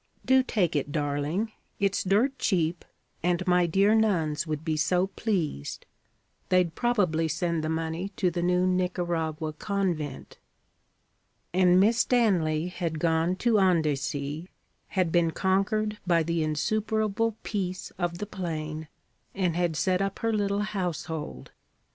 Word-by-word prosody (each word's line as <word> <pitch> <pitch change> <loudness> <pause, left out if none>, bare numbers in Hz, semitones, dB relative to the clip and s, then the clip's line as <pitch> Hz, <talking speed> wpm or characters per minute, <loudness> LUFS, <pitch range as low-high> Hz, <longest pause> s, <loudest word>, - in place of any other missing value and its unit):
Do 260 0 +5
take 200 -10 0
it, 145 0 -1
darling. 150 +8 -1 0.3
It's 200 -1 +1
dirt 235 +8 +2
cheap, 170 -3 0 0.4
and 180 +1 0
my 180 -1 +3
dear 195 +5 +3
nuns 170 -9 +1
would 155 0 -3
be 160 -2 0
so 180 +4 +2
pleased. 185 - -3 0.6
They'd 180 -3 +3
probably 185 -10 +1
send 165 +1 -1
the 155 - -1
money 165 +3 -2
to 180 - +1
the 175 0 -2
new 180 +1 +2
Nicaragua 175 -4 -1
convent.' 170 -6 -3 1.1
And 180 0 +5
Miss 225 +4 +4
Stanley 180 -11 +2
had 170 -3 -3
gone 165 +2 +1
to 230 -3 +5
Andecy, 155 -2 0 0.4
had 185 -4 0
been 170 -1 +3
conquered 205 +4 0
by 170 -2 +4
the 165 +1 -1
insuperable 215 +7 0
peace 185 -3 -3
of 175 -1 -1
the 210 - -4
plain, 160 -5 -5 0.5
and 180 -4 0
had 175 -2 0
set 180 +4 +1
up 195 0 -1
her 225 0 0
little 200 -1 0
household. 165 - -4
180 Hz, 135 wpm, -27 LUFS, 160-195 Hz, 1.1 s, Do